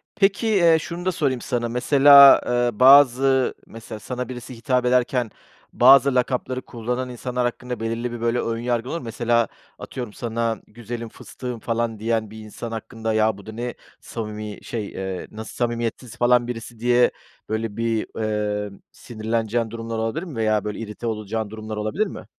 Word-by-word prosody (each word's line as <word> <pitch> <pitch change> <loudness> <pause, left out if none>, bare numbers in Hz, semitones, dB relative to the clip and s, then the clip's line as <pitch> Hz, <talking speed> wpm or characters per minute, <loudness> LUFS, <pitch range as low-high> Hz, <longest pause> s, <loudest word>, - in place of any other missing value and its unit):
Peki, 200 +2 +2
eee, 170 -6 +5
şunu 175 +3 -6
da 185 - +2
sorayım 135 -7 -1
sana. 120 -2 -2
Mesela, 140 +3 +8
eee, 120 -3 0
bazı 135 -1 +6
mesela 115 -1 -9
sana 125 +2 -5
birisi 125 0 -8
hitap 125 +1 0
ederken 125 -2 +1 0.4
bazı 135 +2 +6
lakapları 125 0 0
kullanan 125 +2 -4
insanlar 125 +1 -3
hakkında 125 -1 -4
belirli 115 +2 -3
bir, 120 -1 -6
böyle, 115 +1 +1
ön 115 0 -2
yargın 120 0 -1
olur 165 - -2
mu? - - -11
Mesela 115 -1 +1 0.3
atıyorum 120 -5 -6
sana 115 -1 -2
güzelim, 115 +1 -7
fıstığım 125 0 -8
falan 115 -1 -2
diyen 110 -1 -1
bir 110 - -10
insan 110 +2 -8
hakkında 115 0 -4
ya, 110 -1 +2
bu 100 - -13
da 110 - -7
ne 120 +2 -4 0.3
samimi 105 -2 -6
şey, 110 -4 -4
eee, 95 -1 -5
nasıl 110 +1 -8
samimiyetsiz 120 0 -3
falan 120 0 +3
birisi 115 -1 -7
diye, 120 +1 +4 0.4
böyle, 110 -1 -3
bir, 115 -1 -1
ııı, 105 -2 -2 0.2
sinirleneceğin 115 0 -2
durumlar 115 -1 -5
olabilir 115 +10 -2
mi 160 -9 -8
veya, 110 -2 +1
böyle, 105 0 -4
irite 115 +1 -6
olacağın 110 0 -3
durumlar 110 0 -7
olabilir 145 - -1
mi? - - -9
115 Hz, 165 wpm, -23 LUFS, 110-125 Hz, 0.4 s, Mesela